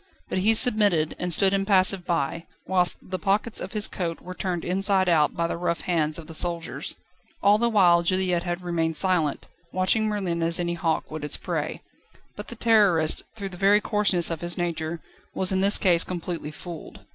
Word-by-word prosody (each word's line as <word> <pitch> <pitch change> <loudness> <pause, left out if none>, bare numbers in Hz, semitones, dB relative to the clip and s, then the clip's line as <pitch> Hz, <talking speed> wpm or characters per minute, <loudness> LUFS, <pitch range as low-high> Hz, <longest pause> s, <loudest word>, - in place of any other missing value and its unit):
But - - -1
he 220 +4 +3
submitted, 205 - +4
and 180 0 -3
stood 190 +3 +3
impassive 195 -2 +2
by, 165 0 -2 0.2
whilst 180 -1 +2
the 185 0 -4
pockets 205 +5 0
of - - -7
his 210 -1 0
coat 170 -3 -4
were 185 - -9
turned 180 -2 -4
inside 190 +1 +1
out 155 -4 +2
by 170 - -1
the 170 - -3
rough 170 -1 -2
hands 155 -3 -1
of 165 - -9
the 160 - -11
soldiers. 170 0 -3 0.5
All 205 +1 +5
the 235 +1 +2
while 180 -6 +4
Juliette 180 0 0
had 175 0 -4
remained 165 -2 -1
silent, 170 -5 -1 0.2
watching 185 +4 +1
Merlin 190 -5 -2
as 165 +1 +1
any 170 -1 -1
hawk 165 -3 -2
would 155 -1 -6
its 150 - -1
prey. - - -4 0.5
But - - -8
the 235 - -7
Terrorist, 205 -9 +2
through 200 -3 -6
the 180 - -11
very 200 +3 +4
coarseness 205 -5 +1
of 165 - -4
his 175 0 0
nature, 165 -1 -3 0.3
was 190 0 0
in 190 0 0
this 200 +1 +6
case 175 -3 +4
completely 170 -3 -5
fooled. 165 +1 -10
180 Hz, 190 wpm, -24 LUFS, 170-195 Hz, 0.5 s, this